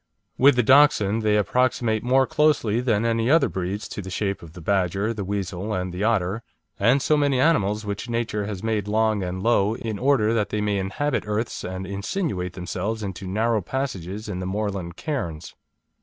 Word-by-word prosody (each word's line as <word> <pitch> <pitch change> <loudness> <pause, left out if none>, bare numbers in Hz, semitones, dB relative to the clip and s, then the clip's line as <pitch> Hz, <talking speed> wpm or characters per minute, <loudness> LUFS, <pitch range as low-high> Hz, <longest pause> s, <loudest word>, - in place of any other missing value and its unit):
With 140 +1 +5
the 125 - +3
Dachshund 115 -5 +5
they 105 -1 +2
approximate 115 +1 +1
more 130 +2 +3
closely 130 -7 +2
than 115 -3 +1
any 115 +1 +1
other 155 -1 +5
breeds 95 +3 -4
to - - -5
the 95 - -8
shape 100 +2 -2
of 80 -2 -12
the 90 - -10
badger, 95 +4 0
the 105 -3 -4
weasel, 100 +1 -3
and 90 -1 -3
the 90 +3 -3
otter, 110 -1 +1 0.4
and 125 +7 +3
so 155 - +3
many 140 -3 +2
animals 110 -9 +2
which 105 +3 -4
Nature 115 -3 -2
has 100 -2 -5
made 110 -3 -1
long 110 0 +1
and 95 +1 -4
low 110 -2 +2
in 110 -3 -5
order 125 -5 +3
that 110 -3 0
they 105 - -2
may 105 -1 0
inhabit 130 +9 -1
earths 105 +2 -2
and 95 +1 -5
insinuate 100 - -3
themselves 95 +5 -4
into 95 -1 -5
narrow 110 +3 +1
passages 105 -4 -4
in 95 -3 -4
the 90 - -4
moorland 95 -3 -3
cairns. 85 - -4
105 Hz, 185 wpm, -24 LUFS, 95-120 Hz, 0.4 s, With